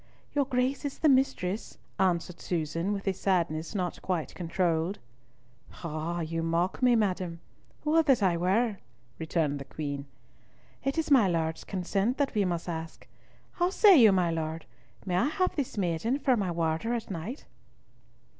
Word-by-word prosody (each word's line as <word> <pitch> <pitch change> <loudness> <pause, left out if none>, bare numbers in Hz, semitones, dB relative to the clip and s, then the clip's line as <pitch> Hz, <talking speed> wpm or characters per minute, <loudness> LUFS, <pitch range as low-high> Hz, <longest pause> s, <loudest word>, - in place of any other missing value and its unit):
"Your 285 -1 +2
Grace 255 +2 0
is 285 -2 -4
the 315 - +2
mistress," 230 -7 +1 0.2
answered 180 -2 0
Susan, 165 +2 -2
with 200 -1 -4
a 195 - +2
sadness 170 -2 -1
not 180 -3 -2
quite 180 -4 -2
controlled. 170 +1 -1 0.9
"Ah! 165 +2 -3
you 165 +1 -2
mock 165 +5 0
me, 250 -1 +5
madam. 185 -5 -1 0.5
Would 315 +1 +3
that 255 -7 +4
I 180 -3 +3
were!" 200 +5 +1 0.4
returned 155 -3 0
the - - -6
Queen. 140 0 -5 0.8
"It 275 +3 -1
is 320 -2 -1
my 245 -8 +6
Lord's 160 -2 -1
consent 195 +6 -1
that 285 -2 0
we 210 -3 +2
must 175 -1 -2
ask. 165 -1 -6 0.4
How 350 0 +1
say 395 0 +7
you, 230 -8 +8
my 180 -3 +2
Lord, 160 0 -3 0.4
may 180 -2 0
I 245 - +3
have 365 +4 0
this 275 -7 -3
maiden 195 +7 0
for 270 -3 +2
my 200 -5 -1
warder 170 +7 0
at 230 -3 -5
night?" 195 - -6
185 Hz, 160 wpm, -29 LUFS, 165-240 Hz, 0.9 s, you